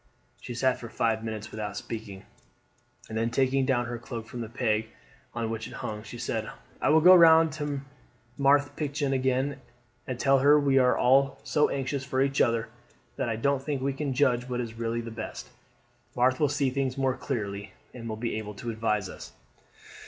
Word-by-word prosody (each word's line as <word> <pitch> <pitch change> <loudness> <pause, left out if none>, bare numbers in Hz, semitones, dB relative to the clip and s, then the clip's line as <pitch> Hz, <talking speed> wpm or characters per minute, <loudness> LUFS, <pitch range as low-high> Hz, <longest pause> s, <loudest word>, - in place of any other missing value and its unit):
She 120 - -7
sat 130 +1 +1
for 115 - -8
five 110 0 0
minutes 110 -1 -5
without 105 -2 -5
speaking, 105 -4 -7 0.8
and 110 - -7
then 115 +1 0
taking 130 +2 +1
down 120 -3 +2
her 120 0 -5
cloak 115 -1 -7
from 120 +1 -7
the 115 - -5
peg 110 -2 0 0.5
on 115 -1 -2
which 110 -1 -4
it - - -11
hung 105 0 -4
she 120 - -9
said; 110 -2 -3 0.3
"I - - +2
will 160 +1 +5
go 180 +3 +9
round 165 -2 +7
to 145 -2 -3 0.5
Marthe 145 +1 +3
Pichon 145 -2 -1
again 130 +1 0 0.5
and 125 -1 -4
tell 135 -1 +4
her 145 +3 +6
we 140 -2 +3
are 125 -1 +3
all 135 +2 +3
so 150 -1 +2
anxious 135 0 -2
for 130 0 -2
each 135 +1 +2
other, 115 -1 +2 0.5
that 130 -4 -1
I 115 - -1
don't 140 +4 +1
think 140 -2 -3
we 140 0 0
can 135 -1 -3
judge 125 -2 +2
what 125 -1 -2
is 115 -2 -4
really 115 +1 -2
the 115 0 -7
best. 115 - -7 0.7
Marthe 130 +1 +2
will 150 -2 +3
see 140 -2 0
things 135 -1 -1
more 135 -1 +1
clearly 100 -6 -4 0.2
and 115 -2 -7
will 110 - -3
be 115 -1 -2
able 105 -1 -7
to 115 +3 -5
advise 105 -3 -1
us." - - -10
125 Hz, 195 wpm, -28 LUFS, 115-140 Hz, 0.8 s, go